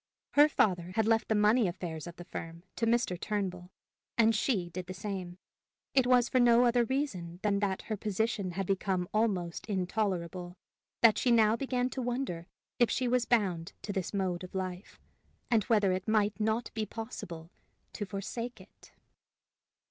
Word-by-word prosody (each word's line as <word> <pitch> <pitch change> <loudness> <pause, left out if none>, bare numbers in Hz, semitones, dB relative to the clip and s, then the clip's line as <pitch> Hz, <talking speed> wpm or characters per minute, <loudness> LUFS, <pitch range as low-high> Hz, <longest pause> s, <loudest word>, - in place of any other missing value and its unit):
Her 295 +1 +6
father 180 - +1
had 220 -1 +2
left 225 0 +2
the 220 - +1
money 210 +2 +4
affairs 170 -2 -5
of 170 - -8
the 175 - -10
firm 165 -1 -7
to 230 - 0
Mr. 230 -7 +1
Turnbull, 185 -4 -3 0.5
and 225 -1 +5
she 205 -5 +1
did 180 +1 -6
the 185 - -6
same. 190 -3 -5 0.6
It 260 -2 +4
was 250 -1 +5
for 255 - +2
no 240 0 +6
other 240 0 +4
reason 190 - -3
than 200 -2 +2
that 195 -2 -1
her 220 - -3
position 210 -2 -1
had 195 +2 -2
become 190 -1 0
almost 195 -6 0
intolerable, 180 -3 -2 0.4
that 230 -2 +6
she 255 - +1
now 225 -2 +5
began 250 0 0
to 260 - -3
wonder 240 -9 -3 0.3
if 240 - +5
she 255 - 0
was 245 0 +2
bound 190 -6 +1
to 200 +1 -4
this 190 -3 -2
mode 185 -3 -1
of 185 - -9
life, 185 0 -5 0.5
and 220 -4 +3
whether 210 -4 +3
it 185 0 -2
might 215 -1 +2
not 220 +2 0
be 220 -2 -2
possible 185 -7 -7 0.4
to 210 - -4
forsake 205 +5 -5
it. - - -18
205 Hz, 170 wpm, -31 LUFS, 180-230 Hz, 0.6 s, Her